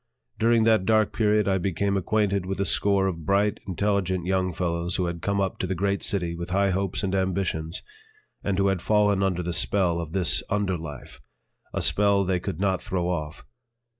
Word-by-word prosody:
During 115 0 +4
that 110 -3 +4
dark 110 -2 +3
period 105 -2 +2
I 95 -1 +2
became 100 +2 -1
acquainted 100 0 +1
with 95 +1 -3
a 100 - +1
score 100 -1 +2
of 85 -4 -3
bright, 100 +5 +1
intelligent 95 -1 0
young 95 0 0
fellows 85 0 -2
who 90 - 0
had 85 -1 -4
come 100 +2 0
up 95 -1 -1
to 95 - -1
the 95 - -2
great 100 +2 0
city 90 -4 -1
with 85 +1 -6
high 100 +1 +2
hopes 95 +1 -1
and 95 -1 -1
ambitions 95 -4 -1 0.6
and 100 -2 -1
who 100 - +2
had 95 -3 -1
fallen 105 -1 +2
under 90 -2 0
the 85 0 -3
spell 90 -2 +1
of 80 -1 -7
this 90 -5 +3
under 100 -2 0
life, 75 -6 -9 0.5
a - - -2
spell 100 -1 +3
they 90 -1 0
could 85 -2 -5
not 95 -2 0
throw 90 -2 -2
off. 75 -3 -4
95 Hz, 195 wpm, -25 LUFS, 90-100 Hz, 0.6 s, During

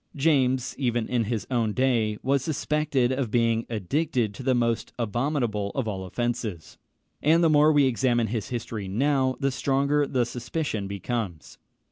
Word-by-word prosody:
James, 130 -4 +2
even 120 -4 0
in 120 -3 0
his 110 -3 -2
own 115 -4 +1
day, 115 -5 +1
was 135 0 +1
suspected 150 -4 0
of 130 -3 -1
being 115 0 +1
addicted 115 - -1
to 100 - -9
the 130 0 +2
most 115 -1 0
abominable 120 -3 -1
of 130 -4 -1
all 95 -3 -4
offences; 110 -4 -4 0.4
and 165 +3 +4
the 165 - +4
more 150 +1 +5
we 145 -2 +4
examine 120 -2 +2
his 110 0 -3
history 115 -4 -4
now, 130 +5 +1
the 140 -1 +1
stronger 140 +2 +1
the 125 -3 +1
suspicion 120 -3 -3
becomes. 100 - -4
120 Hz, 155 wpm, -26 LUFS, 110-140 Hz, 0.4 s, more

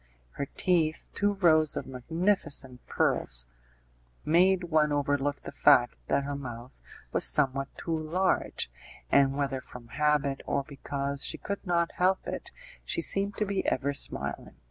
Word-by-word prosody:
Her 140 - -4
teeth 165 -4 +1
two 205 0 +1
rows 155 -5 +3
of - - -3
magnificent 140 - -2
pearls - - +1 0.8
made 180 +3 +4
one 155 -3 +2
overlook 145 0 0
the - - -7
fact 140 -4 +4
that 140 - +1
her 140 0 -4
mouth 120 - -8 0.3
was - - +2
somewhat 135 -1 +2
too 165 -2 -2
large, 165 - 0 0.4
and 135 0 +4
whether 135 -2 -1
from 120 -2 -12
habit, 150 -1 +1
or 140 - 0
because 140 0 -4
she - - +1
could 200 0 -5
not 170 -1 +1
help 185 +1 +1
it, - - -5 0.3
she - - -2
seemed 200 +1 +3
to 210 - 0
be 200 -1 -1
ever 140 +2 0
smiling. 70 - 0
145 Hz, 145 wpm, -28 LUFS, 135-170 Hz, 0.8 s, made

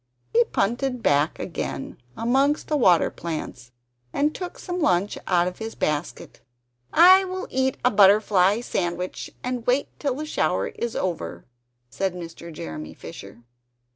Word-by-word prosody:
He 235 - +6
punted 245 +4 -1
back 145 +3 +2
again 155 -7 -5 0.2
amongst 270 +6 +1
the 305 - +1
water 185 - +4
plants, 140 -7 -6 0.4
and 295 +2 +1
took 360 -1 -6
some 360 -1 -4
lunch 185 - +2
out 175 -1 +3
of 180 - -6
his 225 0 -6
basket. 150 +2 -3 0.5
"I 370 +4 +8
will 375 0 -5
eat 265 0 0
a 250 - +5
butterfly 200 0 +5
sandwich, 180 -5 -3
and 250 -1 -3
wait 255 +3 +2
till 280 -4 -1
the 305 +3 -4
shower 305 - 0
is 235 -1 -4
over," 90 - -3 0.5
said 190 -2 -2
Mr. 170 -1 -8
Jeremy 80 - -7
Fisher. 120 - -11
205 Hz, 140 wpm, -24 LUFS, 175-265 Hz, 0.5 s, I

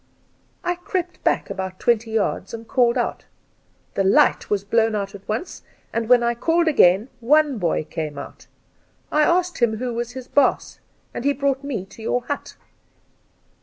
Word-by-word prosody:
I 355 - +1
crept 355 0 -4
back - - +1
about 190 -1 -5
twenty 230 -1 +1
yards 220 -1 -1
and 225 0 -10
called 245 -2 +2
out. - - -2 0.7
The 195 - +1
light 195 - +3
was 200 -2 0
blown 225 +1 +2
out 200 -1 -3
at 200 -1 -12
once, 220 +12 -4 0.3
and 230 0 -2
when 245 -1 +6
I 235 0 +2
called 330 +8 +1
again 200 - +5
one 285 +1 +3
boy 170 -3 0
came 155 -2 -5
out. 140 - -9 0.6
I 305 - +3
asked 350 +2 +2
him 225 -3 +2
who 245 +1 -3
was 240 +1 -4
his 255 -1 -8
baas, 285 -2 +1 0.3
and - - -5
he 285 +1 +2
brought 275 0 -1
me 245 -10 -4
to 195 +3 -14
your 245 +2 -1
hut.' 285 - -5
235 Hz, 170 wpm, -22 LUFS, 205-280 Hz, 0.7 s, when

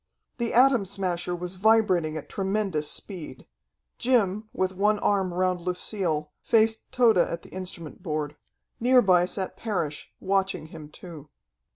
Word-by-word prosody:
The 235 -1 -1
Atom 250 -3 +5
Smasher 180 -2 -2
was 180 +1 -6
vibrating 190 -8 +3
at 150 - -7
tremendous 195 -6 -1
speed. 160 -10 -5 0.5
Jim, 215 -4 +1
with 185 0 -1
one 210 +3 +2
arm 195 -3 +1
round 180 0 0
Lucille, 175 -4 -2
faced 220 -1 +2
Tode 230 -6 +4
at 170 -1 0
the - - -13
instrument 180 -4 -7
board. 150 -3 -3 0.4
Near 250 +1 +5
by 180 -2 +4
sat 185 +1 -3
Parrish, 170 -10 -3
watching 195 -3 0
him 155 -2 -9
too. 155 -2 -11
185 Hz, 140 wpm, -26 LUFS, 170-210 Hz, 0.5 s, Atom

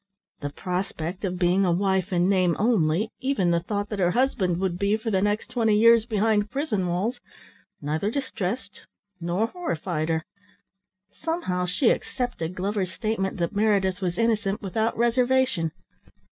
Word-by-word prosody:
The 145 - -3
prospect 180 +2 -4
of 180 -1 -2
being 180 +2 +3
a 180 - +2
wife 190 +1 +1
in 175 0 +2
name 185 -3 +3
only, 205 -3 +2
even 255 -10 +1
the 170 - +3
thought 205 +3 -3
that 210 - -4
her 175 -2 +3
husband 190 -6 +1
would 185 -2 -1
be, 200 +2 +2
for 220 +1 -3
the 190 -2 +2
next 205 +2 -1
twenty 225 -4 +2
years, 230 +1 +6
behind 215 -1 +1
prison 220 - -1
walls, 200 +8 -1 0.6
neither 155 +7 -1
distressed 220 -5 -4 0.3
nor 175 +5 0
horrified 175 - -3
her. 160 -1 0 0.9
Somehow 255 - -2
she 225 +7 +3
accepted 185 -9 -3
Glover's 190 0 -1
statement 210 -2 -2
that 170 +2 -2
Meredith 200 -3 +2
was 180 -2 -2
innocent, 215 -3 +1
without 220 +3 -1
reservation. 245 -7 +2
200 Hz, 150 wpm, -25 LUFS, 180-225 Hz, 0.9 s, years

